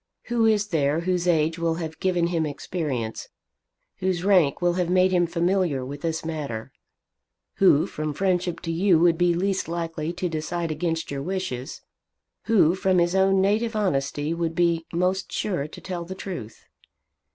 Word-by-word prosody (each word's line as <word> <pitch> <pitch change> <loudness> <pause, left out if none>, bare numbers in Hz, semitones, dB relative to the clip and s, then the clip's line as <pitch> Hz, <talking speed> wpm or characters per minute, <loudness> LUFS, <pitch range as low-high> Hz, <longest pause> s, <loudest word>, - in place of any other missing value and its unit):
Who 235 -2 +3
is 210 -1 +2
there 150 -1 +1
whose 180 0 0
age 160 -1 +2
will 165 -1 0
have 160 -2 -6
given 180 -2 +1
him 165 -2 +1
experience, 145 -6 -4 0.7
whose 185 -2 -1
rank 180 -8 +4
will 175 -1 +2
have 180 -1 -1
made 185 +1 +4
him 175 -2 +3
familiar 170 -5 0
with 140 +2 -7
this 165 -1 -2
matter, 145 -9 -4 0.9
who 160 -6 +5
from 155 0 -4
friendship 180 -2 0
to 165 - -3
you 175 +1 +3
would 170 0 +4
be 175 0 +2
least 190 0 0
likely 165 -1 -3
to 180 +1 -2
decide 165 +1 -3
against 165 0 -2
your 140 -1 -3
wishes, 155 -7 -4 0.6
who 200 -8 +4
from 190 0 +1
his 175 0 +2
own 190 0 +3
native 220 +4 +1
honesty 150 -6 0
would 165 -1 -2
be 170 -1 +1
most 180 +2 0
sure 175 -8 -2
to - - -11
tell 180 -2 -5
the 185 +2 -7
truth?" 175 - -7
170 Hz, 165 wpm, -25 LUFS, 160-185 Hz, 0.9 s, who